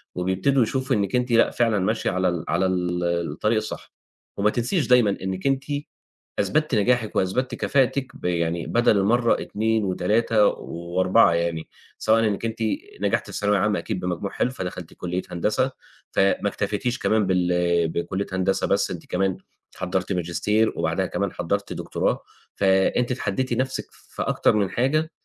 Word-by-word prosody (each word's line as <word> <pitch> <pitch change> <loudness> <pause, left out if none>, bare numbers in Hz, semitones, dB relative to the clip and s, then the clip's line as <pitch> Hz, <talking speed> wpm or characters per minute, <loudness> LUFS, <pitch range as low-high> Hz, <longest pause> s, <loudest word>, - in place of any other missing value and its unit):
وبيبتدوا 95 +9 +2
يشوفوا 130 +2 0
إنِّك 100 +1 0
أنتِ 125 0 0
لأ 115 - +5
فعلًا 115 -4 +1
ماشية 110 +4 0
على 95 +1 +1
ال 85 -3 -3
على 90 +3 +1
ال 90 -1 -1 0.3
الطريق 105 +8 0
الصح. 110 - -5 0.4
وما 105 +1 +3
تنسيش 125 - 0
دايمًا 120 -6 +4
إنِّك 95 +5 -2
أنتِ 135 0 +1 0.8
أثبتِّ 155 -4 +1
نجاحِك 110 +1 +1
وأثبتِّ 125 +8 0
كفاءتِك 135 -1 +1
ب - - -11
يعني 85 -1 -1
بَدَل 120 -3 +3
المرّة 115 +4 +2
2 110 0 0
و3 105 +3 +2
و4 85 +3 +2
يعني، 85 -1 -1 0.3
سواءً 110 +1 +3
إنِّك 105 +2 -2
أنتِ 115 0 -3 0.4
نجحتِ - - +1
في - - -13
الثانوية 100 0 +1
العامة 105 +2 +1
أكيد 105 -5 -4
بمجموع 90 +2 -3
حلو 125 - 0
فدخلتِ 90 -7 -6
كُلّية 90 +1 -3
هندسة، 105 +9 0 0.4
فما 100 +1 +2
اكتفيتيش 105 +6 -2
كمان 110 -2 +2
بال 90 -2 +2
بكُلّية 90 +4 -3
هندسة 95 +1 +1
بس، - - +1
أنتِ - - -7
كمان 95 0 0 0.4
حضّرتِ 95 +1 -2
ماجستير، 90 +5 +1
وبعدها - - 0
كمان - - -2
حضّرتِ - - -2
دكتوراه، - - -1 0.3
فأنتِ 95 +6 +2
اتحدّيتِ 125 +1 -1
نَفْسِك 130 0 -1
في - - -10
أكتر - - +2
من 100 -3 +1
حاجة، 155 +6 +1
100 Hz, 155 wpm, -24 LUFS, 90-120 Hz, 0.8 s, لأ